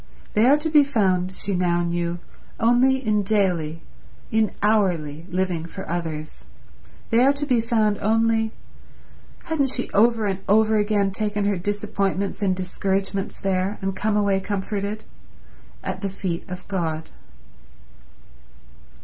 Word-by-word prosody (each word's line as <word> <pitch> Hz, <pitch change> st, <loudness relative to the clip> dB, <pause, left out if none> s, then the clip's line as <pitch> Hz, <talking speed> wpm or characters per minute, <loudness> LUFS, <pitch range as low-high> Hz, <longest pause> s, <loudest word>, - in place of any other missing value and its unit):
They 215 Hz, +3 st, +4 dB
are 285 Hz, +3 st, +6 dB
to 310 Hz, +2 st, -2 dB
be 300 Hz, -2 st, +7 dB
found, 190 Hz, -8 st, +1 dB
she 200 Hz, -, -3 dB
now 175 Hz, -1 st, +1 dB
knew, 170 Hz, 0 st, -1 dB, 0.4 s
only 255 Hz, +3 st, +3 dB
in 210 Hz, -1 st, +2 dB
daily, 180 Hz, -6 st, 0 dB, 0.5 s
in 220 Hz, -1 st, +3 dB
hourly, 175 Hz, -7 st, +1 dB
living 180 Hz, -2 st, -1 dB
for 190 Hz, +3 st, -8 dB
others; 160 Hz, -3 st, -5 dB, 0.6 s
they 230 Hz, +2 st, +5 dB
are 270 Hz, -, +6 dB
to 285 Hz, +1 st, -2 dB
be 250 Hz, -5 st, +2 dB
found 220 Hz, -3 st, +1 dB
only—hadn't 225 Hz, +6 st, -2 dB
she 250 Hz, -1 st, -2 dB
over 225 Hz, +1 st, +3 dB
and 195 Hz, -2 st, -1 dB
over 220 Hz, +1 st, +4 dB
again 205 Hz, -1 st, +1 dB
taken 205 Hz, 0 st, -1 dB
her 205 Hz, 0 st, +2 dB
disappointments 200 Hz, 0 st, -2 dB
and 190 Hz, -2 st, +2 dB
discouragements 195 Hz, +1 st, -2 dB
there, 195 Hz, +1 st, -1 dB
and 195 Hz, 0 st, -2 dB
come 210 Hz, +1 st, 0 dB
away 200 Hz, -2 st, +2 dB
comforted?—at 205 Hz, +2 st, -6 dB
the 200 Hz, -, -1 dB
feet 185 Hz, -2 st, -4 dB
of 180 Hz, 0 st, -7 dB
God. 165 Hz, -5 st, -3 dB
200 Hz, 130 wpm, -23 LUFS, 185-220 Hz, 0.6 s, be